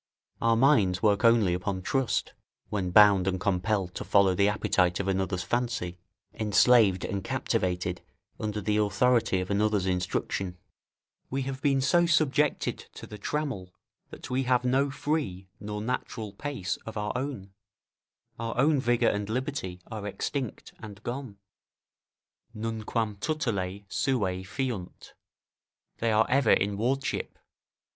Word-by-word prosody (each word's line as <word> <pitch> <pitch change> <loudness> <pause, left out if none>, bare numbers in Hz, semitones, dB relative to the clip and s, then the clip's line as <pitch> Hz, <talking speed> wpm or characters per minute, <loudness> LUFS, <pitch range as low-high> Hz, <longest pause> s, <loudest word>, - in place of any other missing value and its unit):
Our 115 0 +3
minds 110 -9 +3
work 105 0 +3
only 115 -6 +5
upon 95 +1 -3
trust, 135 +4 0 0.4
when 95 -3 -1
bound 100 -1 +6
and 95 -1 0
compelled 95 0 0
to - - -5
follow 100 -2 +4
the 100 +2 +3
appetite 90 -4 +1
of 100 - -2
another's 95 -1 -1
fancy, 120 -8 -2 0.3
enslaved 105 -2 +4
and 95 0 -3
captivated 90 -1 -1 0.4
under 105 -1 -3
the 105 +1 0
authority 105 -1 +2
of 90 - -4
another's 105 -1 +1
instruction; 90 0 -2 0.7
we 135 +1 -1
have 130 0 -5
been 135 -2 +2
so 170 +6 +3
subjected 150 -2 +2 0.2
to - - -8
the 105 - -10
trammel, 110 -9 -3 0.3
that - - -9
we 130 +1 +1
have 125 -1 +1
no 135 +3 +2
free, 135 - -2
nor 105 0 -5
natural 115 -3 -4
pace 140 -11 -3
of 110 - -9
our 105 0 -1
own; 125 -7 -4 0.9
our 115 0 -4
own 145 +3 +4
vigour 120 -2 +2
and 105 0 -3
liberty 120 -7 -3
are 105 -2 -5
extinct 120 +5 -4
and 105 -1 -10
gone: 125 -4 -5 1.2
"Nunquam 110 -1 -2
tutelae 100 -8 -2
suae 95 -7 0
fiunt." 110 -3 -5 0.9
["They 115 0 +1
are 110 +1 +4
ever 130 -3 +4
in 100 +1 +1
wardship." 130 +6 -2
105 Hz, 135 wpm, -28 LUFS, 95-125 Hz, 1.2 s, bound